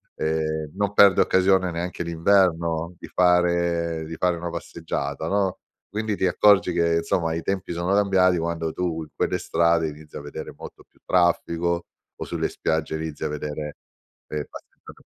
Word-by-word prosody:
ehm, 80 Hz, -1 st, -2 dB
non 100 Hz, +1 st, -1 dB
perde 100 Hz, -2 st, +7 dB
occasione 95 Hz, 0 st, +3 dB
neanche 90 Hz, +1 st, -4 dB
d'inverno 85 Hz, -1 st, +1 dB
di -, -, -10 dB
fare 85 Hz, -2 st, +2 dB
di 80 Hz, +1 st, -7 dB
fare 90 Hz, +1 st, +1 dB
una 85 Hz, +1 st, -4 dB
passeggiata, 80 Hz, -3 st, -4 dB
no, 95 Hz, 0 st, 0 dB, 0.3 s
quindi 110 Hz, +1 st, -2 dB
ti -, -, +1 dB
accorgi 95 Hz, 0 st, +4 dB
che 85 Hz, -1 st, +2 dB
insomma 85 Hz, 0 st, 0 dB
i 80 Hz, -, -4 dB
tempi 95 Hz, -2 st, -2 dB
sono 85 Hz, +3 st, -1 dB
cambiati 95 Hz, -3 st, +3 dB
quando 85 Hz, -1 st, -2 dB
tu 80 Hz, -1 st, -2 dB
in 75 Hz, -, -13 dB
quelle -, -, 0 dB
strade 85 Hz, -1 st, +2 dB
inizi 75 Hz, 0 st, -13 dB
a -, -, -6 dB
vedere 75 Hz, 0 st, -7 dB
molto -, -, -11 dB
più -, -, -32 dB
traffico 85 Hz, -1 st, +1 dB, 0.3 s
o -, -, -6 dB
sulle -, -, -2 dB
spiagge 80 Hz, 0 st, -2 dB
inizi 80 Hz, -1 st, -5 dB
a -, -, +1 dB
vedere, 75 Hz, 0 st, -5 dB, 0.5 s
ehm, 75 Hz, -2 st, -4 dB
passeggiata -, -, -14 dB
85 Hz, 160 wpm, -24 LUFS, 80-90 Hz, 0.5 s, perde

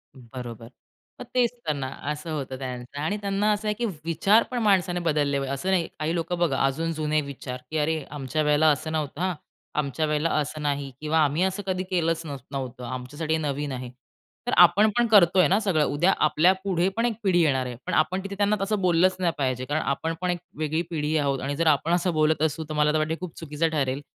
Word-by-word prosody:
बरोबर. 120 Hz, -2 st, -9 dB, 0.5 s
मग -, -, -6 dB
तेच 245 Hz, -2 st, +3 dB, 0.2 s
तर 150 Hz, -, +2 dB
ना, 135 Hz, -2 st, -4 dB, 0.2 s
असं 150 Hz, +2 st, -5 dB
होतं 135 Hz, -3 st, -4 dB
त्यांचं. 125 Hz, +1 st, -6 dB
आणि 205 Hz, +7 st, -1 dB
त्यांना 200 Hz, +1 st, +1 dB
असं 210 Hz, +1 st, -3 dB
आहे, 210 Hz, -, +2 dB
की 240 Hz, +2 st, -2 dB, 0.2 s
विचार 200 Hz, +7 st, +4 dB
पण 245 Hz, -, -1 dB
माणसाने 185 Hz, -3 st, +2 dB
बदलले 150 Hz, -4 st, +1 dB
पाहिजे. 135 Hz, 0 st, -3 dB
असं 160 Hz, +8 st, -3 dB
नाही, 175 Hz, -3 st, +2 dB
काही 160 Hz, +3 st, -1 dB
लोकं 170 Hz, +1 st, -2 dB
बघा 155 Hz, -6 st, +1 dB
अजून 160 Hz, +5 st, -1 dB
जुने 155 Hz, 0 st, 0 dB
विचार, 130 Hz, -2 st, -7 dB
की 160 Hz, -, -1 dB
"अरे, 155 Hz, 0 st, 0 dB
आमच्या 145 Hz, +1 st, -2 dB
वेळेला 150 Hz, +1 st, +3 dB
असं 155 Hz, +3 st, -2 dB
नव्हतं 155 Hz, 0 st, -3 dB
हां. 185 Hz, -1 st, +1 dB, 0.5 s
आमच्या 150 Hz, +2 st, -1 dB
वेळेला 150 Hz, +2 st, 0 dB
असं 150 Hz, +1 st, -2 dB
नाही 140 Hz, -2 st, -2 dB
किंवा 155 Hz, +1 st, +1 dB
आम्ही 150 Hz, +5 st, +1 dB
असं 190 Hz, +2 st, -1 dB
कधी 185 Hz, -1 st, -1 dB
केलंच 165 Hz, -2 st, 0 dB
नाही 140 Hz, -2 st, -5 dB
नव्हतं 130 Hz, -2 st, -5 dB
आमच्यासाठी 130 Hz, +6 st, -4 dB
हे 160 Hz, -, +1 dB
नवीन 145 Hz, -1 st, -2 dB
आहे." 125 Hz, -1 st, -5 dB, 0.6 s
तर -, -, +1 dB
आपण 180 Hz, +5 st, +7 dB
पण 240 Hz, -1 st, +3 dB
करतोय 185 Hz, -4 st, +6 dB
ना, 195 Hz, +4 st, +3 dB
सगळं. 180 Hz, -8 st, +1 dB
उद्या 170 Hz, +7 st, +2 dB
आपल्या 160 Hz, +5 st, +4 dB
पुढे 185 Hz, -2 st, +1 dB
पण 230 Hz, -, +2 dB
एक 235 Hz, -, +1 dB
पिढी 175 Hz, -3 st, +3 dB
येणार 135 Hz, -5 st, +2 dB
आहे. 125 Hz, -1 st, -5 dB
पण -, -, -3 dB
आपण 185 Hz, +5 st, +2 dB
तिथे 200 Hz, 0 st, -6 dB
त्यांना 205 Hz, +1 st, +2 dB
तसं 200 Hz, 0 st, 0 dB
बोललंच 180 Hz, +1 st, +3 dB
नाही 175 Hz, -2 st, +2 dB
पाहिजे. 130 Hz, -2 st, -1 dB
कारण 150 Hz, +3 st, -1 dB
आपण 160 Hz, +4 st, -1 dB
पण 180 Hz, -, 0 dB
एक 175 Hz, -, -3 dB, 0.2 s
वेगळी 155 Hz, +1 st, 0 dB
पिढी 155 Hz, -1 st, -1 dB
आहोत. 140 Hz, -2 st, 0 dB
आणि 140 Hz, +2 st, -2 dB
जर 165 Hz, +1 st, 0 dB
आपण 155 Hz, +3 st, +3 dB
असं 175 Hz, 0 st, +1 dB
बोलत 155 Hz, 0 st, +2 dB
असू, 160 Hz, 0 st, 0 dB
तर -, -, -3 dB
मला 150 Hz, 0 st, +3 dB
तर -, -, +2 dB
वाटते 155 Hz, +1 st, 0 dB
खूप 180 Hz, -3 st, -7 dB
चुकीचं 160 Hz, 0 st, -1 dB
ठरेल 140 Hz, -2 st, -1 dB
155 Hz, 225 wpm, -25 LUFS, 140-180 Hz, 0.6 s, आपण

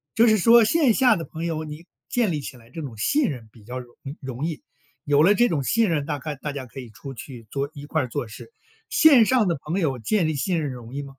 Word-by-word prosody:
就 230 Hz, +1 st, +5 dB
是 215 Hz, -1 st, +5 dB
说 230 Hz, +4 st, +6 dB
线 270 Hz, 0 st, +3 dB
下 250 Hz, -3 st, +4 dB
的 165 Hz, -, -5 dB
朋 165 Hz, +2 st, -6 dB
友， 160 Hz, -2 st, -2 dB
你 155 Hz, +2 st, -9 dB, 0.2 s
建 235 Hz, -7 st, +1 dB
立 150 Hz, -, -2 dB
起 130 Hz, -, -8 dB
来 115 Hz, -1 st, -19 dB
这 160 Hz, +6 st, -7 dB
种 130 Hz, -6 st, -7 dB
信 285 Hz, -, +2 dB
任 120 Hz, -6 st, -7 dB
比 110 Hz, -4 st, -18 dB
较 125 Hz, +3 st, -6 dB
容 120 Hz, -1 st, -11 dB
易 140 Hz, +2 st, -7 dB
容 130 Hz, +2 st, -5 dB
易， 165 Hz, -3 st, -4 dB, 0.4 s
有 145 Hz, +1 st, +4 dB
了 200 Hz, -, +6 dB
这 240 Hz, +4 st, +3 dB
种 145 Hz, -5 st, -1 dB
信 225 Hz, -, +2 dB
任， 150 Hz, -4 st, 0 dB
大 150 Hz, -1 st, -3 dB
概 150 Hz, +2 st, -5 dB
大 145 Hz, +2 st, -5 dB
家 135 Hz, -2 st, -6 dB
可 135 Hz, -, -10 dB
以 125 Hz, -, -9 dB
出 135 Hz, +7 st, -9 dB
去 115 Hz, -1 st, -10 dB
做 140 Hz, 0 st, -2 dB
一 145 Hz, -1 st, -9 dB
块 155 Hz, -3 st, 0 dB
做 125 Hz, -1 st, -4 dB
事， 110 Hz, -, -12 dB, 0.4 s
线 280 Hz, -8 st, +6 dB
上 245 Hz, -3 st, +3 dB
的 170 Hz, -4 st, 0 dB
朋 170 Hz, +6 st, -2 dB
友 140 Hz, -7 st, 0 dB
建 180 Hz, -, +1 dB
立 155 Hz, -, -1 dB
信 170 Hz, +4 st, 0 dB
任 145 Hz, -3 st, -3 dB
容 120 Hz, 0 st, -10 dB
易 145 Hz, -, -2 dB
吗？ -, -, -8 dB
150 Hz, 290 characters per minute, -24 LUFS, 135-200 Hz, 0.4 s, 说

